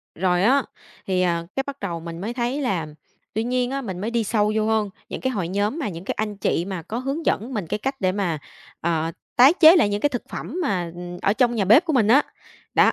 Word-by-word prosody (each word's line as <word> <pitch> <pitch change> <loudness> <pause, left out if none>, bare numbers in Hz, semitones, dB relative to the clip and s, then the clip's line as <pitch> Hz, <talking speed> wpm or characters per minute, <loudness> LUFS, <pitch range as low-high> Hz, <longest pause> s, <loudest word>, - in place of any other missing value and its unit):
Rồi 180 +1 +1
á, 265 +5 +4 0.4
thì, 185 -1 +1
à, 170 -2 +1
cái 270 - 0
bắt 280 0 -6
đầu 170 -4 -3
mình 165 +1 -7
mới 220 +4 -3
thấy 245 +4 -1
là, 190 - -1 0.5
tuy 220 - 0
nhiên 250 +1 0
á, 275 0 -2
mình 190 -8 -5
mới 220 +3 -2
đi 235 -1 +1
sâu 210 0 +1
vô 215 -1 +1
hơn, 220 -2 +1 0.2
những - - -5
cái 260 - 0
hội 195 -8 -2
nhóm 205 - -1
mà 280 - -2
những 170 0 -8
cái - - -1
anh 210 -2 -2
chị 175 -3 0
mà 190 -3 -4
có 215 +8 -5
hướng 275 +6 -3
dẫn 235 +6 0
mình 205 -7 -3
cái - - -1
cách 270 +4 -3
để 185 - +2
mà, 185 -5 -1 0.4
ờ, 165 -1 0 0.2
tái 265 +5 +7
chế 320 +1 +9
lại 295 - +4
những 205 0 -2
cái 290 - +3
thực 245 -4 -4
phẩm 360 - -5
mà, 180 - -1
ừm, 175 0 -7
ở 200 - +2
trong 240 +1 +2
nhà 205 -4 +1
bếp 235 - +6
của 320 - 0
mình 235 -6 +3
á, 260 +6 +6 0.5
đó. - - +5
215 Hz, 260 wpm, -23 LUFS, 185-255 Hz, 0.5 s, chế